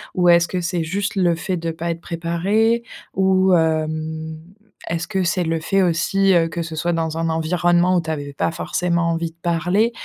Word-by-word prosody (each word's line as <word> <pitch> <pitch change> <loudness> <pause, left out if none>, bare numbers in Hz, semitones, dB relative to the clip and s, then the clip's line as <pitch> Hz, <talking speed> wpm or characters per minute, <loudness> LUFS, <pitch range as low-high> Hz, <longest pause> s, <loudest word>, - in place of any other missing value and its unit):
Ou 180 -1 +2
est-ce 170 0 +5
que 185 - -2
c'est 170 -1 -1
juste 200 +5 -2
le 175 -3 +2
fait 180 +3 -3
de 165 -1 -3
pas 170 +1 -3
être 165 0 -6
préparé? 195 +9 0 0.3
Ou, 190 0 +3
hem, 160 -1 -1 0.5
est-ce 170 +1 -2
que 190 -3 0
c'est 175 +1 +1
le 165 0 -1
fait 195 +4 +1
aussi, 190 +3 +2
heu, 165 -1 +3
que 170 +1 -4
ce 160 -1 -5
soit 175 +1 0
dans 160 -1 -2
un 165 0 -1
environnement 175 +2 +2
où - - +2
tu 160 - -7
avais 145 -2 -4
pas 165 - -1
forcément 170 0 -1
envie 165 0 -2
de - - -32
parler? 180 +6 +1
170 Hz, 205 wpm, -21 LUFS, 165-185 Hz, 0.5 s, est-ce